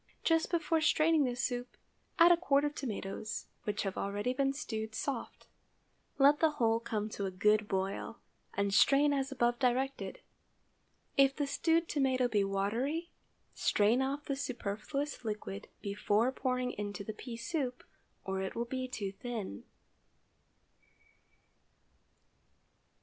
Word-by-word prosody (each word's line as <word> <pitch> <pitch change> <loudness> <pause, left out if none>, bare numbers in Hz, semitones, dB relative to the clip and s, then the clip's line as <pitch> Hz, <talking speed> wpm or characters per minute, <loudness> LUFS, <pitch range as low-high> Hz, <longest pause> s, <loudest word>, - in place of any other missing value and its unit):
Just 325 0 +3
before 330 -2 +1
straining 315 -1 +4
the 245 -1 -1
soup, 245 -1 -3 0.4
add 340 0 +8
a - - +8
quart 285 -4 +2
of 295 - -1
tomatoes, 215 -5 -4 0.2
which 210 -1 -1
have 195 -2 -3
already 205 +5 -1
been 270 +1 +1
stewed 220 -6 -4
soft; 265 -2 -4 0.7
let 285 +2 +6
the 320 - +5
whole 230 -5 +2
come 220 -2 -2
to 200 -2 -3
a - - -1
good 210 +3 +2
boil, 195 0 -2 0.4
and 200 0 0
strain 285 +7 +5
as 275 0 -1
above 240 -2 +1
directed. 265 +1 0 1.0
If 275 0 +5
the 290 - 0
stewed 325 +4 +1
tomato 260 -3 +2
be 210 -4 +2
watery, 230 - -1 0.4
strain 215 +5 +3
off 280 +2 -2
the 275 - -1
superfluous 270 +3 -3
liquid 210 - -5 0.2
before 210 +4 +1
pouring 255 -1 -1
into 205 -1 -5
the 215 - -5
pea 230 +2 -7
soup, 255 0 -3 0.4
or 190 0 -2
it 190 - -4
will 235 +1 -1
be 255 +1 -3
too 205 -6 -4
thin. 200 - -6
245 Hz, 135 wpm, -33 LUFS, 210-280 Hz, 1.0 s, add